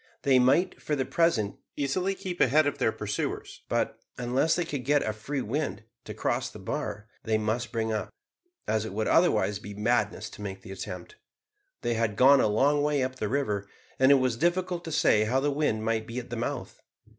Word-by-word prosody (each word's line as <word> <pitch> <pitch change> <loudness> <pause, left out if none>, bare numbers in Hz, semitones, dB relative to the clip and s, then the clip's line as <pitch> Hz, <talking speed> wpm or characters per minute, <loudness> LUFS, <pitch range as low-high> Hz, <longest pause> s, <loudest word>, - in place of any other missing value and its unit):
They 135 -2 +5
might, 140 +9 +3
for 150 - -1
the 135 -2 -1
present, 140 - +1 0.2
easily 180 +8 0
keep 180 -2 -5
ahead 150 +4 +5
of 145 - -1
their - - +2
pursuers; - - -4
but, - - -1 0.2
unless 125 +6 +1
they 175 - 0
could 145 -5 -4
get 145 +2 +3
a 110 - -1
free 130 +6 -4
wind, 115 -4 -2 0.2
to - - -7
cross - - -1
the - - -11
bar, 105 +2 -4 0.2
they 110 -1 +1
must 110 +3 -2
bring 115 -1 -1
up, 110 - -2 0.6
as 110 -1 +1
it 110 - -6
would 110 +1 -1
otherwise 110 - +3
be 105 -1 -9
madness 105 0 0
to - - -11
make 95 -1 -6
the - - -9
attempt. 90 -2 -7 0.7
They 120 - +1
had 115 -2 0
gone 135 +4 +7
a - - +3
long 140 +8 +3
way 145 -2 +1
up 130 0 -3
the 105 -4 -2
river, 105 -7 -1 0.3
and 130 +1 +6
it - - +8
was 130 -3 +1
difficult 175 +3 0
to 165 - -5
say 110 -7 +3
how 125 +5 +2
the 145 +2 +1
wind 140 -7 0
might 110 -1 0
be 115 - -6
at 125 -1 -6
the - - -2
mouth. 115 - -4
125 Hz, 210 wpm, -28 LUFS, 110-145 Hz, 0.7 s, it